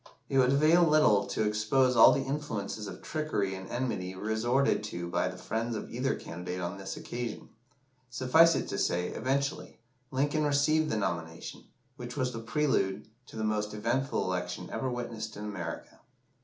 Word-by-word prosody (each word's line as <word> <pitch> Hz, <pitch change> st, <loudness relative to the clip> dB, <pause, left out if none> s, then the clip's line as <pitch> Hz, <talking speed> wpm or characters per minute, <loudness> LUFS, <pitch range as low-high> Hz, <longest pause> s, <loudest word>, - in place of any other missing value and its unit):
It 135 Hz, -, +3 dB
would 130 Hz, +1 st, +4 dB
avail 155 Hz, +5 st, +5 dB
little 150 Hz, -11 st, +4 dB
to -, -, -1 dB
expose 110 Hz, +5 st, +2 dB
all 115 Hz, -, +9 dB
the 135 Hz, -, +1 dB
influences 125 Hz, -7 st, -4 dB
of 90 Hz, -2 st, -9 dB
trickery 150 Hz, -12 st, -1 dB
and 95 Hz, 0 st, -7 dB
enmity 95 Hz, -7 st, -2 dB
resorted 110 Hz, +6 st, +1 dB
to 85 Hz, -4 st, -5 dB
by 85 Hz, -, 0 dB
the -, -, -6 dB
friends 115 Hz, +1 st, -2 dB
of -, -, -6 dB
either 130 Hz, +3 st, 0 dB
candidate 90 Hz, +2 st, -6 dB
on 90 Hz, +2 st, -4 dB
this 95 Hz, 0 st, -6 dB
occasion 120 Hz, -2 st, -5 dB, 0.6 s
suffice 160 Hz, +7 st, +5 dB
it -, -, -2 dB
to 100 Hz, -, -2 dB
say 90 Hz, +1 st, 0 dB
that, -, -, -6 dB
eventually, 140 Hz, +2 st, -2 dB, 0.3 s
Lincoln 145 Hz, +4 st, +1 dB
received 150 Hz, +2 st, +2 dB
the 110 Hz, -, 0 dB
nomination, 80 Hz, -4 st, -4 dB, 0.3 s
which 120 Hz, +2 st, -7 dB
was 130 Hz, -2 st, 0 dB
the 115 Hz, -, -4 dB
prelude 115 Hz, -6 st, 0 dB, 0.2 s
to -, -, -13 dB
the 110 Hz, -, -3 dB
most 105 Hz, 0 st, -1 dB
eventful 115 Hz, +5 st, 0 dB
election 90 Hz, -1 st, -3 dB
ever 120 Hz, +4 st, -2 dB
witnessed 115 Hz, -3 st, -5 dB
in 105 Hz, -, -6 dB
America. 90 Hz, -5 st, -6 dB
115 Hz, 170 wpm, -30 LUFS, 100-135 Hz, 0.6 s, all